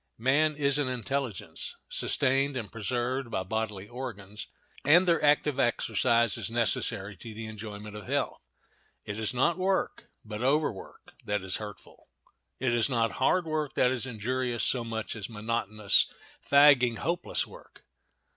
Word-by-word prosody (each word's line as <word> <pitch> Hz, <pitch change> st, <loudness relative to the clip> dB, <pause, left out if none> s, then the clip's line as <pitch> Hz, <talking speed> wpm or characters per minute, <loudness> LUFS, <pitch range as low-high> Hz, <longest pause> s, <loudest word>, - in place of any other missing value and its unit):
Man 145 Hz, +6 st, +2 dB
is 140 Hz, -1 st, +2 dB
an 145 Hz, -, +1 dB
intelligence, 130 Hz, -3 st, -3 dB
sustained 135 Hz, +1 st, +2 dB
and 115 Hz, -4 st, -5 dB
preserved 120 Hz, +3 st, -2 dB
by 95 Hz, -, -2 dB
bodily 105 Hz, -1 st, -3 dB
organs, 110 Hz, -4 st, -7 dB, 0.4 s
and 175 Hz, +5 st, +6 dB
their 170 Hz, -2 st, +3 dB
active 145 Hz, -1 st, +3 dB
exercise 115 Hz, -2 st, +2 dB
is -, -, -1 dB
necessary 115 Hz, -3 st, 0 dB
to 110 Hz, +4 st, -9 dB
the 110 Hz, +1 st, -6 dB
enjoyment 105 Hz, -1 st, -8 dB
of 105 Hz, -, -9 dB
health. -, -, -1 dB, 0.6 s
It 105 Hz, +1 st, -5 dB
is 110 Hz, -, +1 dB
not 165 Hz, +8 st, +1 dB
work, 190 Hz, +1 st, -1 dB, 0.2 s
but 105 Hz, 0 st, -6 dB
overwork, 135 Hz, -5 st, -1 dB
that 105 Hz, -2 st, -1 dB
is 95 Hz, -1 st, -1 dB
hurtful; 105 Hz, -1 st, -10 dB, 0.5 s
it 125 Hz, -2 st, 0 dB
is 120 Hz, +2 st, +3 dB
not 115 Hz, -3 st, +1 dB
hard 180 Hz, +6 st, +3 dB
work 155 Hz, -2 st, -2 dB
that 125 Hz, -, +3 dB
is 130 Hz, 0 st, -2 dB
injurious 125 Hz, +1 st, -2 dB
so 125 Hz, -2 st, +2 dB
much 110 Hz, -1 st, -4 dB
as 105 Hz, -1 st, -6 dB
monotonous, 110 Hz, -2 st, +1 dB, 0.4 s
fagging, 140 Hz, -5 st, +6 dB
hopeless 170 Hz, +2 st, -1 dB
work. -, -, -16 dB
120 Hz, 145 wpm, -29 LUFS, 110-135 Hz, 0.6 s, and